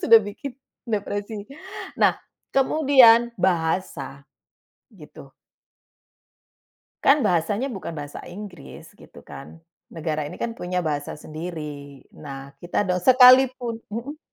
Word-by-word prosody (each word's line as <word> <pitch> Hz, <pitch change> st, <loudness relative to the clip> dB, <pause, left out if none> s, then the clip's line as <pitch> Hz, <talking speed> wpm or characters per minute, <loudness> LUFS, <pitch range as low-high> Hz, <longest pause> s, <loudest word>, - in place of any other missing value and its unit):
sudah 225 Hz, -1 st, +8 dB
bikin 210 Hz, +7 st, -7 dB, 0.3 s
depresi. 205 Hz, -1 st, -4 dB, 0.5 s
Nah, -, -, +2 dB, 0.3 s
kemudian 260 Hz, -5 st, +5 dB
bahasa 160 Hz, -5 st, -1 dB, 0.6 s
gitu. -, -, -14 dB, 1.7 s
Kan 280 Hz, 0 st, +5 dB
bahasanya 205 Hz, +9 st, 0 dB
bukan 190 Hz, -6 st, -6 dB
bahasa 145 Hz, 0 st, -7 dB
Inggris 180 Hz, -4 st, -10 dB
gitu -, -, -16 dB
kan. 135 Hz, -, -11 dB, 0.5 s
Negara 155 Hz, -1 st, -3 dB
ini -, -, -8 dB
kan 235 Hz, -, -1 dB
punya 180 Hz, +1 st, -3 dB
bahasa 145 Hz, -2 st, -3 dB
sendiri. 160 Hz, +1 st, -6 dB, 0.5 s
Nah, 140 Hz, -3 st, -9 dB, 0.2 s
kita 175 Hz, +3 st, -1 dB
dos 180 Hz, -1 st, -2 dB
sekalipun. 255 Hz, -2 st, +6 dB, 0.2 s
Heeh. 280 Hz, +7 st, -6 dB
200 Hz, 105 wpm, -23 LUFS, 165-240 Hz, 1.7 s, sudah